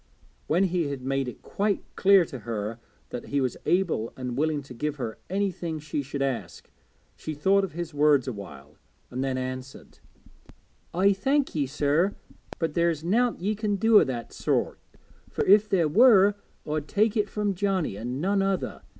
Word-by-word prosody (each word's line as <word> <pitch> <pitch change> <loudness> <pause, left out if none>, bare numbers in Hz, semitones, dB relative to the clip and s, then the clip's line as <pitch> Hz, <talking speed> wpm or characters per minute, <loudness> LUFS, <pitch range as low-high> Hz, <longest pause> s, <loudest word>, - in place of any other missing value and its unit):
When 175 +5 +3
he 175 -4 0
had 140 -2 -5
made 135 0 -1
it 125 - -8
quite 205 0 -1
clear 195 -2 +5
to 130 - -8
her 110 0 -4 0.3
that 125 - -6
he 140 - 0
was 130 -3 -1
able 175 - +1
and 125 -2 -4
willing 150 +1 0
to 135 - -11
give 150 +5 -3
her 115 -6 -5
anything 180 -4 -2
she 150 -1 -3
should 140 0 -3
ask, 135 -3 -4 0.4
she 155 - -6
thought 195 +7 +3
of 190 - -4
his 170 -1 -5
words 145 -2 +3
a 130 - -2
while, 75 -8 -11 0.3
and 130 +2 -2
then 135 -1 -1
answered 130 +1 -7 1.0
'I 195 +3 +4
thank 270 +8 0
ye, 145 -4 0
sir, 150 +7 +1 0.4
but 165 -2 -2
there's 170 -2 +1
nowt 230 +4 +1
ye 205 +4 0
can 210 -1 -1
do 220 +2 +6
o' - - +5
that 120 -3 -5
sort, - - -1 0.5
fur - - -1
if 210 +2 +5
there 175 -5 +3
was 205 - +6 0.3
I'd 150 0 -2
take 215 +5 +2
it 210 -2 +1
from 210 -1 -1
Johnnie 190 - -1
an' 120 +5 -4
none 195 +4 +1
other. 195 -1 -2
155 Hz, 180 wpm, -26 LUFS, 130-195 Hz, 1.0 s, do